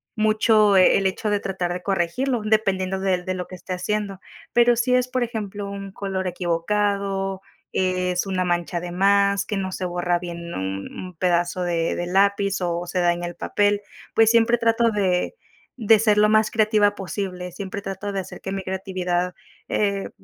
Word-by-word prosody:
mucho, 215 -1 +4
eh, 185 -1 +6
el 195 - -1
hecho 200 +3 -2
de 205 -1 +1
tratar 185 -3 -3
de 180 0 -4
corregirlo, 205 +8 0
dependiendo 195 -3 +1
del 185 -2 0
de 185 - -1
lo 180 -1 -5
que 185 - -9
esté 185 - -10
haciendo. 200 +1 -2 0.3
Pero 240 0 +5
si 240 +2 +1
es, 250 0 +3
por 255 0 -1
ejemplo, 205 -3 -5
un 195 -1 -7
color 190 -2 -3
equivocado, 195 +2 -1 0.3
es 185 -1 0
una 185 -2 -1
mancha 175 -1 -1
de 175 - -6
más, 200 +2 +3
que 210 - -3
no 190 -1 -2
se 185 - -4
borra 175 0 0
bien 170 -1 -7
un 95 +1 -4
un 185 -1 -8
pedazo 175 +1 0
de 170 -2 0
de 175 - -2
lápiz 200 +1 +2
o 175 0 -1
se 180 +1 -2
daña 175 0 +1
el 175 - -7
papel, 205 0 +1 0.3
pues 225 -1 +5
siempre 235 +1 +4
trato 230 0 +2
de 190 - 0 0.4
de 220 -2 +5
ser 210 -1 +3
lo 210 0 +5
más 215 0 +3
creativa 210 -2 +3
posible, 180 -2 -5
siempre 200 +1 -5
trato 195 +1 -5
de 195 - -2
hacer 190 0 -8
que 190 - -5
mi 195 0 -3
creatividad, 180 -1 -2 0.4
eh, 200 -2 0
195 Hz, 185 wpm, -23 LUFS, 180-210 Hz, 0.4 s, eh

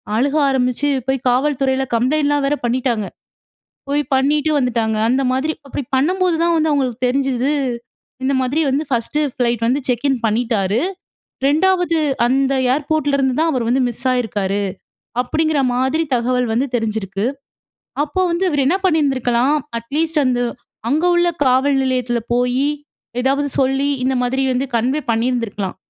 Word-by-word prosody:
அழுக 275 +6 +1
ஆரம்பிச்சு, 255 +2 0 0.2
போய் 265 -1 -1
காவல்துறைல 265 0 +1
கம்ப்ளைண்ட்லாம் 285 +3 +1
வேற 290 - +1
பண்ணீட்டாங்க. 240 -3 0 0.8
போய் 290 +1 +2
பண்ணீட்டு 295 +3 +2
வந்துட்டாங்க. 230 -4 0
அந்த 260 +2 +2
மாதிரி 275 +5 0
அப்படி 275 +1 -4
பண்ணம்போது 360 +5 +2
தான் 340 0 +2
வந்து 315 0 +1
அவங்களுக்கு 255 -4 0
தெரிஞ்சுது, 270 0 0 0.7
"இந்த 275 +1 +1
மாதிரி 275 +5 0
வந்து 280 +4 0
1ஸ்டு 255 +4 -1
ஃபிளைட் 235 -2 0
வந்து 260 +4 +1
செக்கின் 255 +1 +1
பண்ணீட்டாரு. 220 -2 +1 0.7
2வது 355 +1 +2 0.3
அந்த 270 +2 +2 0.2
ஏர்போர்ட்லருந்து 280 -2 0
தான் 325 0 +2
அவர் 250 -4 -1
வந்து 255 +2 +2
மிஸ் 240 +2 -5
ஆயிருக்காரு." 205 -5 -1 0.6
அப்படீங்கிற 310 +3 0 0.2
மாதிரி 265 +6 +1
தகவல் 250 0 0
வந்து 245 +5 +1
தெரிஞ்சிருக்கு. 215 -3 -2 0.8
அப்போ 305 +5 -3
வந்து 340 +3 0
இவரு 290 -3 0
என்னா 360 +8 +2
பண்ணீருந்திருக்கலாம், 270 -4 +2 0.2
அட்லீஸ்ட் 310 +7 -1
அந்த 250 -1 +1 0.5
அங்க 305 +7 +1
உள்ள 345 0 +3 0.2
காவல் 265 +2 +3
நிலையத்தில 250 -2 0
போயி, 250 +3 +1 0.5
எதாவது 280 +2 +1
சொல்லி, 270 +1 +1 0.2
இந்த 265 +1 +1
மாதிரி 265 +2 0
வந்து 255 +2 -1
கன்வே 255 +6 0
பண்ணிருந்திருக்கலாம். 225 -4 -1
265 Hz, 135 wpm, -19 LUFS, 245-290 Hz, 0.8 s, உள்ள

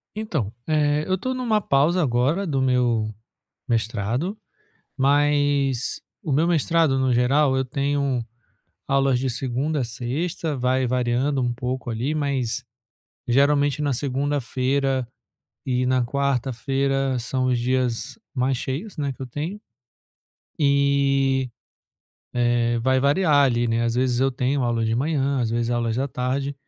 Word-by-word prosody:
Então, 155 - -2 0.2
eh, 150 -1 +2
eu 185 0 +1
tô 260 +7 -3
numa 230 -5 0
pausa 160 +5 +2
agora 140 +8 +1
do 135 -3 0
meu 120 -4 +2 0.6
mestrado, 115 - -1 0.6
mas 145 -2 +2 0.2
o 150 - -2
meu 160 +5 +3
mestrado 165 -4 +2
no 130 -1 +2
geral 130 +3 +3
eu 130 - +1
tenho 140 -2 -1 0.6
aulas 135 -2 +2
de 130 +1 -1
segunda 135 +5 -1
a - - 0
sexta, 140 +7 -3
vai 130 +1 +1
variando 125 +2 0
um 120 -1 0
pouco 125 0 -4
ali 125 +7 -2
mas, 130 -5 -1 0.6
geralmente 140 +3 +2
na 140 -2 +1
segunda-feira 135 -1 -1 0.6
e 125 -1 0
na 130 -1 +2
quarta-feira 135 0 0
são 130 +2 -1
os 125 -1 +2
dias 125 - -1 0.2
mais 130 0 +1
cheios, 160 - -5
né, 140 -2 -2
que 135 - -14
eu 130 - -4
tenho. 160 - -5 1.0
E, 140 -2 +2 0.8
eh, 120 -1 +2
vai 130 0 +2
variar 145 -1 +4
ali, 120 -1 +1
né, 115 +1 +1
às 115 0 0
vezes 125 -1 +1
eu 135 0 +3
tenho 130 +2 0
aula 115 -1 0
de 110 0 0
manhã 140 0 0
às 115 - 0
vezes 115 0 -1
aulas 115 -1 0
da 135 +2 0
tarde 135 +3 -2
135 Hz, 140 wpm, -23 LUFS, 125-145 Hz, 1.0 s, variar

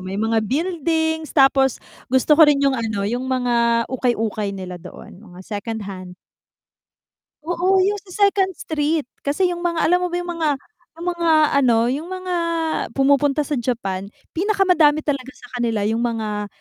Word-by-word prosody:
may 185 +1 -5
mga 225 +1 +1
buildings 320 - -1
tapos 270 -2 +4 0.3
gusto 260 +4 +3
ko 315 - +9
rin 280 -1 +3
yung 275 - +3
ano, 220 -4 -2
yung 240 +5 -2
mga 235 -2 +1
ukay-ukay 225 -5 -1
nila 180 -2 -7
doon, 180 +1 -12
mga 180 -4 -13
secondhand. 205 -4 -6 1.3
Oo, 355 +3 +2
yung 410 +2 +1
sa 400 +2 +3
second 385 -1 0
street, 305 -3 -2 0.2
kasi 355 +6 +1
yung 350 0 -5
mga 340 -1 0
alam 355 +2 +4
mo - - +1
ba - - 0
yung 350 0 -5
mga 320 -2 +1 0.5
yung 335 +2 -8
mga 340 -1 0 0.3
ano, 240 -4 +4
yung 290 +6 -3
mga 370 0 -4 0.6
pumupunta 280 +1 +3
sa 290 -2 -2
Japan, 200 -6 -3 0.2
pinakamadami 360 -6 +3
talaga 275 -3 -3
sa 245 - -16
kanila 230 -3 0
yung 220 +2 0
mga 220 -3 -2
270 Hz, 155 wpm, -21 LUFS, 225-330 Hz, 1.3 s, ko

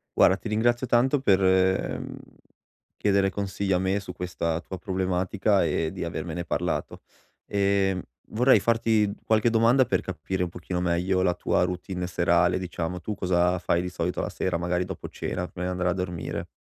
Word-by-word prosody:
Guarda, 95 - +5
ti 110 - -7
ringrazio 120 +4 +1
tanto 130 +4 +3
per, 100 -7 +3
mhmm, 95 0 +1 0.8
chiedere 100 -1 +2
consigli 100 0 -2
a 90 - +3
me 95 +2 0
su 95 -2 -8
questa 85 -2 -2
tua 95 +2 -8
problematica 95 +1 0
e 80 0 0
di - - -4
avermene 85 -1 -4
parlato. - - -2 0.4
Ehm, 100 -2 +1 0.3
vorrei 125 +4 +5
farti 115 -3 +2
qualche 110 +1 +3
domanda 115 +3 +4
per 125 - 0
capire 95 0 -3
un 90 - 0
pochino 90 0 -4
meglio 90 +2 +1
la 90 -1 +2
tua 90 - 0
routine 90 0 -4
serale. 85 0 +2
Diciamo, 90 -1 -4
tu 105 - -4
cosa 90 -1 +1
fai 85 -1 +1
di 90 - -3
solito 90 0 -2
la - - -1
sera, 90 -2 -1
magari 90 +1 0
dopo 95 -2 -7
cena, 90 - -4
prima 90 0 -5
di 90 - -1
andare 90 0 0
a - - +1
dormire? 90 -2 -4
95 Hz, 175 wpm, -26 LUFS, 90-100 Hz, 0.8 s, Guarda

